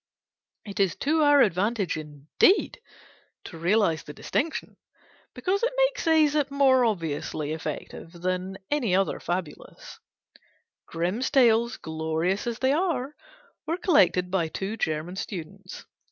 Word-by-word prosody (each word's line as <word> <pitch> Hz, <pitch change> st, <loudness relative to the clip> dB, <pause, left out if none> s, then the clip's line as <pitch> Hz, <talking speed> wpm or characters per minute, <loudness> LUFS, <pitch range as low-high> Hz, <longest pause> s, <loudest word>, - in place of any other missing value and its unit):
It 200 Hz, -2 st, -7 dB
is 195 Hz, -3 st, +2 dB
to 310 Hz, +3 st, +1 dB
our 290 Hz, -1 st, +6 dB
advantage, 200 Hz, -1 st, +1 dB
indeed, 155 Hz, -, +1 dB, 0.6 s
to -, -, -10 dB
realise 175 Hz, -2 st, +2 dB
the 150 Hz, -, -11 dB
distinction; 315 Hz, +3 st, -3 dB, 0.6 s
because 385 Hz, +2 st, -1 dB
it 485 Hz, -, +1 dB
makes -, -, +1 dB
Æsop 300 Hz, -3 st, +3 dB
more 270 Hz, -2 st, +4 dB
obviously 155 Hz, -6 st, -2 dB
effective 160 Hz, +1 st, -6 dB
than 185 Hz, +2 st, -3 dB
any 245 Hz, -11 st, +1 dB
other 195 Hz, 0 st, 0 dB
fabulist. 175 Hz, -3 st, -6 dB, 0.9 s
Grimm's 180 Hz, +9 st, -2 dB
Tales, 235 Hz, -3 st, +3 dB
glorious 160 Hz, +6 st, -2 dB
as 235 Hz, -1 st, -2 dB
they 260 Hz, +2 st, +2 dB
are, 300 Hz, -4 st, -1 dB, 0.5 s
were 330 Hz, +2 st, -1 dB
collected 180 Hz, -, +3 dB
by 180 Hz, -4 st, +1 dB
two 195 Hz, +6 st, -4 dB
German 160 Hz, -1 st, -3 dB
students. 190 Hz, +1 st, -7 dB
195 Hz, 125 wpm, -26 LUFS, 170-280 Hz, 0.9 s, our